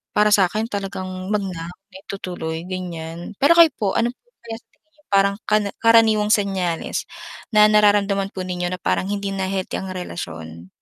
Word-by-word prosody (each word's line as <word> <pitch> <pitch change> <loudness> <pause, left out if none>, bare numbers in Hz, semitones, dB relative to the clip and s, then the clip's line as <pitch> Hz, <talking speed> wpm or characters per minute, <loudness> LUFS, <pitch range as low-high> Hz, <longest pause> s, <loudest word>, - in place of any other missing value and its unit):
Para 210 0 +4
sa'kin 210 +3 +2
talagang 190 -1 -5
huwag 210 -1 +1
na, 170 -3 -6
na 195 +1 -16
itutuloy 175 -4 -5
ganiyan. 170 -1 -6
Pero 285 +5 +6
kayo 335 -2 +7
po, 200 -3 0
ano 235 +1 +1
po - - -56 0.2
kaya 225 -1 -6
sa 230 - -39
tingin 315 - -46
niyo 300 - -29
parang 200 0 +4
kara 210 -1 +2
karaniwang 225 -2 +5
senyales 190 -5 -1 0.5
na 210 0 +7
nararamdaman 205 -2 +3
po 185 - -3
ninyo 180 -1 -3
na 185 - -3
parang 185 - 0
hindi 200 -1 -2
na 190 -1 -2
healthy 190 -1 -3
ang 190 - -6
relasyon? 85 - -7
195 Hz, 180 wpm, -21 LUFS, 180-210 Hz, 0.5 s, kayo